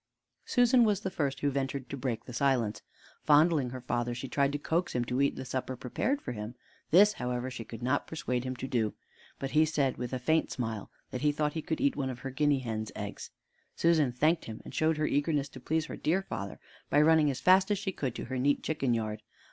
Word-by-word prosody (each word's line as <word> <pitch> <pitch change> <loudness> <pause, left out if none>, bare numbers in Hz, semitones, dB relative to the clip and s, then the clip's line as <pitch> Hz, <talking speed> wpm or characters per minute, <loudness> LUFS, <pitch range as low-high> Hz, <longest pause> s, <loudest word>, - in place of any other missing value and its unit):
Susan 245 0 +5
was 210 -4 +2
the 190 - -3
first 140 -7 -2
who 145 - +2
ventured 135 -1 -2
to - - -5
break 125 -4 -3
the 125 - -9
silence. 125 -4 +1 0.4
Fondling 150 -3 +4
her 130 +1 -7
father, 120 -1 -1
she 125 +2 -5
tried 140 +1 +1
to 145 - -1
coax 165 +3 -1
him 120 -1 +1
to 125 +3 0
eat 140 - +2
the 130 - -6
supper 130 0 -3
prepared 245 - -2
for - - -4
him. 110 +1 -6 0.3
This, 205 +6 +7
however, 125 -2 -3
she 115 - -6
could 115 +1 -9
not 130 +3 0
persuade 125 -6 -2
him 130 0 -3
to 130 - -5
do, 115 -6 0 0.4
but 135 0 -4
he 155 +1 +5
said, 145 -4 +1
with 125 -1 -4
a 130 - -1
faint 160 +6 +1
smile, 115 -4 -4 0.2
that 125 - -4
he 150 0 +3
thought 150 0 -1
he 160 - -3
could 160 - -3
eat 140 - +2
one 135 -2 -1
of 125 -1 -6
her 135 - -5
guinea 145 +1 +2
hen's 110 -3 -4
eggs. - - -6 0.5
Susan 160 -6 +3
thanked 155 +7 +2
him, 110 -1 -7
and - - -9
showed 160 0 +2
her 155 - +1
eagerness 145 -1 +1
to 130 - -11
please 160 +5 0
her - - -6
dear 180 +5 +1
father 100 - -6 0.3
by - - +4
running 155 -1 +5
as 130 -2 -2
fast 190 +2 +5
as 205 - +2
she 195 0 -2
could 130 -9 -3
to - - -5
her 130 +1 -3
neat 140 +3 +2
chicken 135 -6 0
yard. 110 -1 -3
135 Hz, 235 wpm, -30 LUFS, 125-155 Hz, 0.5 s, This